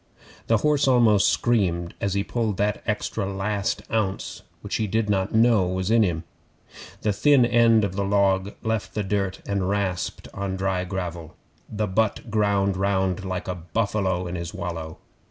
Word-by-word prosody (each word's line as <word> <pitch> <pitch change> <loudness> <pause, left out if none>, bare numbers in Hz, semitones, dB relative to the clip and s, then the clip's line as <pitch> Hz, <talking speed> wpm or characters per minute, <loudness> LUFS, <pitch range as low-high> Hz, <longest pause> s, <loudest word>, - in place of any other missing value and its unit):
The 115 - +4
horse 150 +3 +2
almost 115 -6 +5
screamed 90 -8 +1
as 100 -1 -1
he 100 - +1
pulled 110 -3 -2
that 105 0 0
extra 100 0 -2
last 100 +1 -2
ounce 100 -4 -2 0.2
which - - -3
he 110 - -1
did 110 +1 0
not 95 +1 0
know 110 -4 +4
was 95 +2 -2
in 115 0 +5
him. 85 -5 0 0.8
The 105 - +2
thin 140 +2 +4
end 115 -2 +4
of 95 -2 -2
the 100 - 0
log 100 0 +1
left 110 -2 -2
the 105 - 0
dirt 95 -1 -2
and 100 -2 -1
rasped 95 -3 -2
on 95 -1 -3
dry 95 -1 -1
gravel. 85 -3 -5 0.3
The 105 0 -1
butt 110 +3 -1
ground 100 -3 +1
round 95 -1 0
like 95 -1 -4
a 90 - -1
buffalo 95 0 -1
in 85 - -5
his 85 -1 -5
wallow. 80 -2 -5
100 Hz, 170 wpm, -24 LUFS, 95-110 Hz, 0.8 s, almost